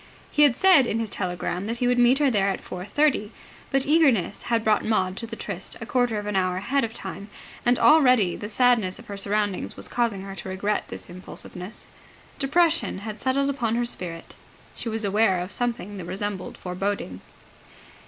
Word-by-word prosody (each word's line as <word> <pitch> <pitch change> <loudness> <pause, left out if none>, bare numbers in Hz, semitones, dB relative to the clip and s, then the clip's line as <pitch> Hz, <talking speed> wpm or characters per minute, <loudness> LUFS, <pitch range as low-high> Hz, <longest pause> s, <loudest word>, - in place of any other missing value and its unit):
He 295 - +2
had 285 -5 +6
said 360 -8 +6
in 225 - -1
his 225 -3 -3
telegram 180 +1 -3
that 230 +1 -2
he 245 - 0
would 245 0 +2
meet 245 +2 +5
her 285 -2 +3
there 200 -3 +2
at 195 - -2
four 180 0 -7
thirty: 245 -2 +1 0.4
but 270 0 +1
eagerness 275 - +3
had 230 -2 +2
brought 215 -1 +3
Maud 190 -4 0
to 230 - -3
the - - -6
tryst - - -6
a - - -6
quarter 245 -4 +1
of 205 - -4
an 210 -1 -3
hour 185 -1 +1
ahead 270 +9 0
of 225 - -2
time: 200 -1 -7 0.4
and 245 0 +4
already 250 - +5
the 210 - -6
sadness 225 -5 +2
of - - -13
her 200 - -7
surroundings 205 0 -1
was - - -2
causing 230 -5 -1
her 195 0 -7
to - - -6
regret 200 +3 -1
this - - -7
impulsiveness. 180 +2 -7 0.5
Depression 330 - +2
had 215 -1 -6
settled 275 +2 +1
upon 235 -5 -1
her 240 0 +1
spirit. 170 -7 -6 0.4
She 230 - -5
was 220 -1 -2
aware 200 -2 +3
of 180 +2 -5
something 235 -5 -3
that 180 - -6
resembled 190 +1 -4
foreboding. 180 - -3
215 Hz, 195 wpm, -25 LUFS, 190-245 Hz, 0.5 s, had